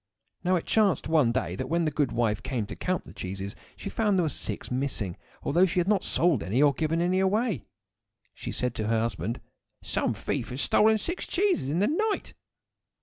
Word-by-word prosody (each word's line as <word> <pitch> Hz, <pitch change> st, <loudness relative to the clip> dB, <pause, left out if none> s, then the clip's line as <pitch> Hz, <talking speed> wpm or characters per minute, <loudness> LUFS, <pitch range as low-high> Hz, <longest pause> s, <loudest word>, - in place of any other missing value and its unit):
Now 185 Hz, +1 st, +3 dB
it 170 Hz, -, -1 dB
chanced 210 Hz, -5 st, +2 dB
one 150 Hz, -7 st, +4 dB
day 130 Hz, +2 st, -1 dB
that 130 Hz, 0 st, -4 dB
when 170 Hz, +1 st, +2 dB
the 155 Hz, -, +1 dB
good 145 Hz, -2 st, +1 dB
wife 115 Hz, -3 st, +1 dB
came 130 Hz, -5 st, -2 dB
to -, -, -7 dB
count 185 Hz, -1 st, -1 dB
the -, -, -13 dB
cheeses 95 Hz, +2 st, -5 dB, 0.2 s
she -, -, -7 dB
found 210 Hz, -3 st, +2 dB
that -, -, +4 dB
there -, -, +1 dB
were -, -, +1 dB
six -, -, -6 dB
missing, 125 Hz, -8 st, -2 dB, 0.3 s
although 175 Hz, +6 st, +4 dB
she 175 Hz, -, -3 dB
had 175 Hz, -, +1 dB
not 205 Hz, -1 st, +3 dB
sold 165 Hz, -, +2 dB
any 95 Hz, +10 st, 0 dB
or 145 Hz, -1 st, +5 dB
given 160 Hz, +2 st, 0 dB
them 175 Hz, +2 st, +1 dB
away. 190 Hz, -, +2 dB
So -, -, -26 dB, 0.7 s
she -, -, -6 dB
said 125 Hz, -1 st, -1 dB
to 110 Hz, -, -1 dB
her 115 Hz, 0 st, +2 dB
husband,— 115 Hz, 0 st, -2 dB, 0.4 s
"Some -, -, 0 dB
thief -, -, -3 dB
has 125 Hz, -, -5 dB
stolen 220 Hz, +8 st, +4 dB
six 345 Hz, -, -4 dB
cheeses 365 Hz, -, +1 dB
in 155 Hz, -, 0 dB
the 205 Hz, -, +4 dB
night." 420 Hz, +7 st, 0 dB
155 Hz, 215 wpm, -28 LUFS, 120-190 Hz, 0.7 s, or